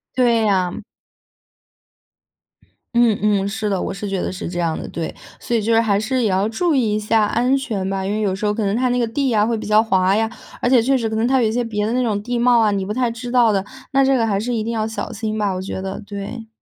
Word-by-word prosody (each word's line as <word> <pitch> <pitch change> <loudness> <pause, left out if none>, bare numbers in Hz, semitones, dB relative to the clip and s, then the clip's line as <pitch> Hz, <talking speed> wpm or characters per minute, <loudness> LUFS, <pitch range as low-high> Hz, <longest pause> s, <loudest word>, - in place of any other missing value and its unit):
对 240 -3 +3
呀。 185 -3 +2 2.3
嗯 235 -3 +4
嗯， 205 -2 +2
是 210 +1 -2
的， 195 -2 0
我 - - -3
是 200 +1 -5
觉 195 -2 -2
得 - - -2
是 185 - -6
这 175 +1 -4
样 165 -2 -1
的， - - -6
对。 165 -1 -5 0.2
所 240 - -3
以 225 - +2
就 225 +2 +1
是 225 - +5
还 205 -3 +1
是 250 +3 -1
也 215 - +2
要 190 +2 +1
注 320 +9 0
意 225 -6 +1
一 - - +1
下 215 0 +2
安 245 +5 +1
全 210 -8 -3
吧。 195 -1 -2
因 - - -2
为 215 - -1
有 200 -3 0
时 195 +3 -3
候 210 - +2
可 220 0 -2
能 200 - 0
它 250 +3 +1
那 245 - +1
个 240 - +2
地 270 +5 -1
呀 215 -4 +3
会 230 0 0
比 215 - -6
较 215 +1 +5
滑 190 -3 +2
呀， 225 +1 +1 0.3
而 245 - +1
且 250 -3 +5
确 270 +3 +2
实 230 -3 -2
可 220 - -3
能 225 - +1
它 260 0 +3
有 225 - +3
一 - - -2
些 245 +2 0
别 210 -3 -2
的 220 - -1
那 255 - +1
种 215 -4 0
地 245 +1 -2
貌 240 0 +4
啊， 215 - +3
你 195 -1 -1
不 210 - -3
太 245 -1 0
知 240 +1 -7
道 240 -3 +4
的。 195 -2 0 0.3
那 275 0 +4
这 270 - +3
个 230 - +2
还 200 -3 0
是 245 +4 -2
一 220 -2 -1
定 230 - -3
要 220 -1 -1
小 220 - -5
心 215 0 -3
吧， 205 -2 0
我 185 - -4
觉 190 0 -5
得， 190 0 -5
对。 205 +3 -6
220 Hz, 305 characters per minute, -20 LUFS, 200-240 Hz, 2.3 s, 是